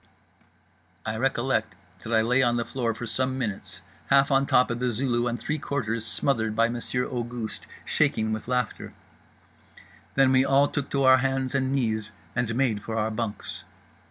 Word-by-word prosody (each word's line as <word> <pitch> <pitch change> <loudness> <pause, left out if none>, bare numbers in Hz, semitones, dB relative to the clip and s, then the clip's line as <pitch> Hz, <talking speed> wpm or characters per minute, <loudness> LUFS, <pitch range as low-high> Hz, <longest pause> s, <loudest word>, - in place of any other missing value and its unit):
I 110 - -2
recollect 130 +2 0 0.3
that 110 - -7
I 110 -1 +4
lay 125 +4 +3
on 120 -2 +2
the 120 - -1
floor 115 -4 -2
for 120 - -5
some 130 +3 -1
minutes, 110 -7 -4 0.2
half 140 +1 +4
on 135 0 +3
top 125 - +4
of 120 - -3
The 125 0 +1
Zulu 120 0 0
and 120 0 -1
three 150 +5 -3
quarters 115 -6 -2
smothered 110 -6 0
by 115 +1 +3
Monsieur 120 +1 -1
Auguste, 120 -3 -5 0.2
shaking 110 0 +1
with 110 - -5
laughter…. 125 -3 -2 1.2
Then 135 -1 +5
we 130 0 +5
all 135 +1 +4
took 145 -2 -3
to 140 -1 0
our 130 0 +7
hands 135 0 -1
and 135 -1 +1
knees, 110 -5 0 0.2
and 120 -1 0
made 120 -5 +1
for 115 +2 -4
our 110 0 0
bunks. 110 -2 -4
120 Hz, 175 wpm, -26 LUFS, 115-135 Hz, 1.2 s, our